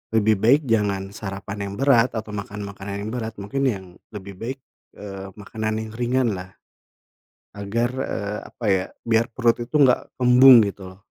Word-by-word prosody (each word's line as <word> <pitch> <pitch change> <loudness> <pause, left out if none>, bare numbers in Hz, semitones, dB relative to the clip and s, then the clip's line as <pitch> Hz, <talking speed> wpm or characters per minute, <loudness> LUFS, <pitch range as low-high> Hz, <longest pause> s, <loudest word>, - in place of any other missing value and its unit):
lebih 110 0 +4
baik 125 +8 +5
jangan 100 -4 0
sarapan 100 0 -6
yang - - -7
berat 130 -3 +3
atau 110 -1 -5
makan 100 0 -6
makanan 100 0 -6
yang 110 - -4
berat. 115 -3 -4
Mungkin 120 +8 -3
yang 100 -7 -2 0.3
lebih 100 -1 -8
baik, 125 +7 -5 0.4
eee, 95 -1 -8
makanan 110 +1 -4
yang 110 - -9
ringanlah, 120 -6 -1 1.1
agar, 105 +4 -1
eee, 105 -5 -3
apa 120 - -11
ya, 95 -2 +2 0.2
biar 115 0 +2
perut 120 0 +1
itu 120 +6 -3
nggak 130 -4 +3
kembung 125 -1 +8
gitu 95 -1 -7
loh. 95 - -24
110 Hz, 160 wpm, -23 LUFS, 100-120 Hz, 1.1 s, kembung